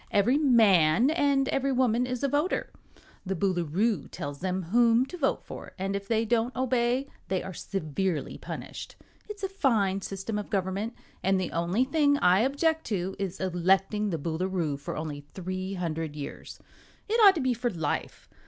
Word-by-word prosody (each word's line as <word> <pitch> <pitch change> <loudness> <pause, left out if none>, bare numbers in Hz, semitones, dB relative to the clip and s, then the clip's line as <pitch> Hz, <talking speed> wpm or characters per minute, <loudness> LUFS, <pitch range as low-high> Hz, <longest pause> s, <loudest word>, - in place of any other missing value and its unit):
Every 235 +8 +3
man 225 - +5
and 280 -4 +2
every 275 0 0
woman 250 -1 +2
is 250 +1 -3
a - - +3
voter. 295 +6 0 0.5
The 190 0 -2
Boolooroo 185 +3 0
tells 145 0 -6
them 185 +1 -2
whom 230 +6 +4
to 360 - -9
vote 285 -6 0
for, - - -9
and 195 +1 -2
if 200 0 -4
they 225 0 +1
don't 235 +2 0
obey 255 +1 +1 0.2
they 190 -1 -1
are 190 0 -6
severely 175 -1 -3
punished. - - -7 0.3
It's 410 -2 -8
a - - +1
fine 225 - +1
system 195 +3 -4
of 205 - -6
government, 195 +4 -2 0.3
and 190 0 +2
the 185 - -2
only 175 +8 +1
thing 285 +1 +2
I 180 -5 +4
object 310 +6 +1
to 190 -3 -2
is 195 -2 -3
electing 190 +3 +1
the 170 - -1
Boolooroo 165 0 -2
for - - -5
only 150 -2 -4
three 185 +1 -4
hundred 165 -4 -3
years. 145 -2 -8 0.5
It 455 +2 +2
ought 395 -2 +9
to - - -1
be 260 -1 +2
for 240 +1 -1
life. 165 -8 -3
200 Hz, 170 wpm, -28 LUFS, 185-255 Hz, 0.5 s, ought